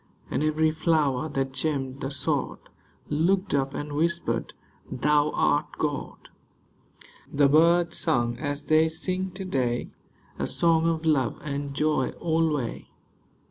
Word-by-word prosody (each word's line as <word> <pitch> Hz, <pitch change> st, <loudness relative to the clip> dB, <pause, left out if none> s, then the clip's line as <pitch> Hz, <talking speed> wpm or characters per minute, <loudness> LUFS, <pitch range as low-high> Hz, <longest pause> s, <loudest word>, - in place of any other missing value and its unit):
And -, -, 0 dB
every 155 Hz, +1 st, +2 dB
flower 155 Hz, -3 st, +1 dB
that 135 Hz, -2 st, -2 dB
gemmed 135 Hz, -2 st, -2 dB
the 135 Hz, -, -2 dB
sod 140 Hz, -1 st, -1 dB, 0.5 s
Looked 185 Hz, +6 st, +1 dB
up 135 Hz, -1 st, 0 dB
and 145 Hz, 0 st, -5 dB
whispered, 170 Hz, +3 st, -1 dB, 0.2 s
" -, -, -26 dB
Thou 150 Hz, 0 st, +4 dB
art 145 Hz, +1 st, +2 dB
God." 145 Hz, -2 st, -4 dB, 1.0 s
The 145 Hz, 0 st, +4 dB
birds 170 Hz, +3 st, +4 dB
sung 120 Hz, -7 st, +1 dB
as 145 Hz, +1 st, -3 dB
they 155 Hz, +1 st, +4 dB
sing 185 Hz, +3 st, -2 dB
to 190 Hz, 0 st, -5 dB
day, 125 Hz, -8 st, -1 dB, 0.5 s
A -, -, -1 dB
song 165 Hz, -1 st, +3 dB
of 165 Hz, 0 st, -2 dB
love 140 Hz, -7 st, +1 dB
and 140 Hz, -1 st, -4 dB
joy 150 Hz, -3 st, +1 dB
alway. 160 Hz, -6 st, -1 dB
150 Hz, 135 wpm, -26 LUFS, 140-160 Hz, 1.0 s, Thou